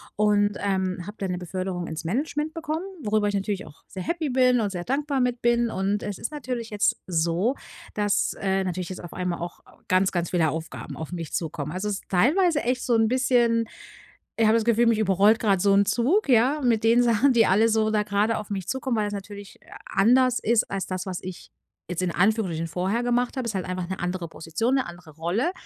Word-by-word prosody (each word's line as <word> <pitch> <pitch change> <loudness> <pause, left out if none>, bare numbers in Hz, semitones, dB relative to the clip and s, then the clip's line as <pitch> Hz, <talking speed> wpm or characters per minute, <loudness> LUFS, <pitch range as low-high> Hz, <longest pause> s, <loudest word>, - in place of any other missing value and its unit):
und, 205 -1 +2
ähm, 190 -2 -1
habe 210 +2 -9
da 195 - -2
'ne 180 -1 -2
Beförderung 180 0 -4
ins 160 +1 -6
Management 295 - -2
bekommen, 330 +1 -3 0.2
worüber 210 0 +1
ich 205 - -1
natürlich 200 0 -2
auch 150 0 -16
sehr 185 - -6
happy 325 - -2
bin 250 -1 +3
und 205 - 0
sehr 175 -2 -5
dankbar 280 +1 -1
mit 250 -1 0
bin. 240 0 +2
Und 195 +1 -1
es 205 -3 -4
ist 235 - -4
natürlich 250 -6 -5
jetzt 210 -1 +1
so, 175 +8 +1 0.4
dass, 205 -1 +1
äh, 195 -1 0
natürlich 180 -1 -3
jetzt 185 -1 -7
auf 175 - -9
einmal 180 -2 -3
auch 175 0 -6 0.3
ganz, 185 +1 +3
ganz 175 -2 -1
viele 165 -3 +2
Aufgaben 160 +1 -6
auf 160 0 -7
mich 165 -4 -6
zukommen. 150 -3 -3
Also 190 +3 -2
es 205 - -1
ist - - -8
teilweise 300 - +3
echt 250 +1 0
so 240 - +2
'n 225 -1 +3
bisschen 255 +1 0 1.0
ich 225 - +3
habe 215 - +5
das 230 - +2
Gefühl, 235 +1 +3
mich 230 -2 +3
überrollt 205 +2 +4
grad 200 -4 +2
so 200 -1 +4
'n 200 +1 +4
Zug, 270 - +2
ja, 260 +5 +4
mit 230 -4 +2
den 230 +2 +5
Sachen, 240 +3 +3
die 230 -2 +4
alle 210 +5 +4
so 220 -1 +2
da 210 -1 +2
grade 210 +2 +1
auf 210 -1 -7
mich 190 -3 -4
zukommen, 265 -2 -1
weil 210 - +1
das 205 - -4
natürlich 200 0 -8
a - - -11 0.2
anders 250 +3 +4
ist 230 0 +1
als 195 -1 -2
das, 185 -1 -4
was 185 -2 -3
ich- 185 -1 -9 0.4
jetzt 180 0 -2
in 180 - 0
Anführungsstrichen- 180 -3 +1
vorher 190 +8 -1
gemacht 245 +1 0
habe. 255 - -2
Ist 215 - -3
halt 185 - -2
einfach 185 -1 -4
'ne 190 - -4
andere 180 -1 -3
Position, 195 +12 -1
'ne 265 - 0
andere 175 -2 -11
Rolle. 180 - 0
205 Hz, 225 wpm, -25 LUFS, 185-240 Hz, 1.0 s, habe